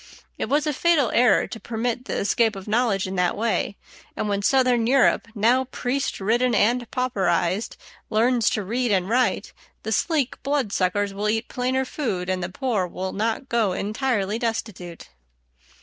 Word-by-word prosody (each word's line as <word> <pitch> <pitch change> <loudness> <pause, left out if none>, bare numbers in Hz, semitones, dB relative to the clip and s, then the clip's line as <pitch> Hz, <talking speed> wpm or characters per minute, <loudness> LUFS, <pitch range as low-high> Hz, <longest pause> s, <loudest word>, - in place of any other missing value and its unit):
It - - -2
was 295 +2 +2
a 300 - 0
fatal 300 -5 +2
error 240 -4 +4
to 225 - -8
permit 240 +2 -3
the - - -3
escape 220 +2 +1
of 195 +1 -9
knowledge 215 -3 +1
in 190 0 -4
that 180 -1 +1
way; 220 -2 -1 0.4
and - - -1
when 200 -1 -1
southern 250 0 +3
Europe, 260 -2 +3
now 240 +5 +3
priest 260 +2 -2
ridden 235 +5 +1
and 240 +2 +2
pauperized, 205 -6 0 0.3
learns 230 +1 +2
to 210 - -2
read 240 +4 -1
and 185 -2 +1
write, 245 +4 0 0.3
the - - -4
sleek 300 -7 0
blood 275 -7 -1
suckers 200 +2 0
will 205 +2 -1
eat 225 +2 -1
plainer 260 +1 -1
food 190 -11 -3
and 185 0 -2
the 175 - -3
poor 215 -3 -1
will 185 +2 -5
not 225 +5 -2
go 225 -6 +1
entirely 215 0 -1
destitute. 215 -7 -4
225 Hz, 165 wpm, -23 LUFS, 200-250 Hz, 0.4 s, error